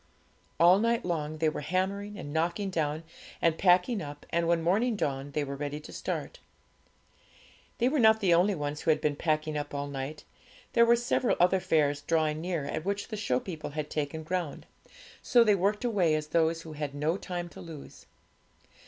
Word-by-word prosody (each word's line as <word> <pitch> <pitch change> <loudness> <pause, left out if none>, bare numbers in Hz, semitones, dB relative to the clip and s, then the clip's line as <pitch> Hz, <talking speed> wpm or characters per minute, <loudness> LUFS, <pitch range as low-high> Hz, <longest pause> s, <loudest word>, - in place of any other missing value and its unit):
All 175 +3 +7
night 230 +1 +1
long 155 -3 -2
they 160 0 +1
were 155 - -2
hammering, 195 +6 -2
and 145 -6 -7
knocking 170 +5 -1
down, 155 -2 -1 0.4
and 165 -1 +2
packing 185 +5 +3
up, 145 -1 -8
and 170 0 +1
when 170 -1 +2
morning 215 +8 +2
dawned 140 -6 -3
they 150 - 0
were 140 0 -5
ready 145 +1 -4
to 150 - -12
start. - - -4 1.4
They 240 - +2
were 285 +3 +1
not 220 -1 +6
the 190 -5 +3
only 185 +4 +3
ones 145 -1 -4
who - - -1
had 155 -1 +4
been 150 -2 0
packing 155 0 -1
up 145 -1 -4
all 140 0 -2
night. 140 +2 -6 0.5
There 235 0 +5
were 235 - +6
several 240 +1 +1
other 180 +2 +4
fairs 145 -4 +1
drawing 155 0 0
near, 170 -4 -2
at 155 +2 -3
which 200 +3 -3
the 220 - -4
show 165 - 0
people 160 +1 -6
had 150 0 -5
taken 155 +1 -3
ground; 170 -2 -3 0.6
so 240 -1 +5
they 215 -2 +4
worked 200 +5 0
away 185 -9 +2
as 155 0 -3
those 165 0 +1
who 160 - -9
had 145 -2 -5
no 150 +4 0
time 175 -3 -5
to - - -12
lose. 160 -4 -11
165 Hz, 195 wpm, -29 LUFS, 150-195 Hz, 1.4 s, All